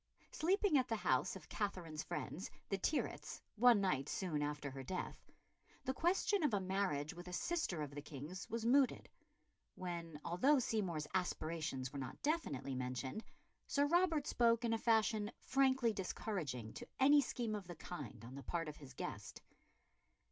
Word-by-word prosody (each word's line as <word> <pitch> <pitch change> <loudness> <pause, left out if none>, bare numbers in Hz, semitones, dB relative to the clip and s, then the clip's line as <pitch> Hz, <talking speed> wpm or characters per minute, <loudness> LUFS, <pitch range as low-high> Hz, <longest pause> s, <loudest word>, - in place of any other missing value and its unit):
Sleeping 365 -2 +3
at 255 - 0
the 230 - 0
house 215 - +1
of - - -10
Katherine's 175 -7 -3
friends, 185 - -4 0.2
the 195 - +1
Tyrwhitts, 295 +10 -1 0.2
one 235 0 +7
night 150 -8 +1
soon 165 -6 -1
after 145 -1 -2
her 135 0 -6
death, 180 +8 -5 0.6
the 260 - +1
question 370 +6 +2
of 290 -9 +3
a - - +2
marriage 185 -6 0
with 175 0 -9
a 180 - -6
sister 255 - 0
of 145 -1 -6
the 145 - -5
King's 150 +6 -7
was 230 0 -2
mooted; 265 +2 +4 0.7
when, 170 -4 -5
although 260 - +4
Seymour's 190 - 0
aspirations 155 -7 -1
were 140 - -3
not 130 -1 -5
definitely 145 - 0
mentioned, 130 - -3 0.4
Sir 285 0 +3
Robert 325 -2 +3
spoke 235 0 +3
in 230 - +2
a 225 - +1
fashion 220 -2 +3
frankly 260 -3 +3
discouraging 165 - -3
to - - -8
any 285 +2 +7
scheme 240 -4 -2
of 205 -4 -4
the 175 - -6
kind 130 -9 -7
on 125 - -9
the 140 - -6
part 165 +2 -2
of 150 - -6
his 135 -3 -12
guest. - - -6
190 Hz, 165 wpm, -38 LUFS, 150-245 Hz, 0.7 s, one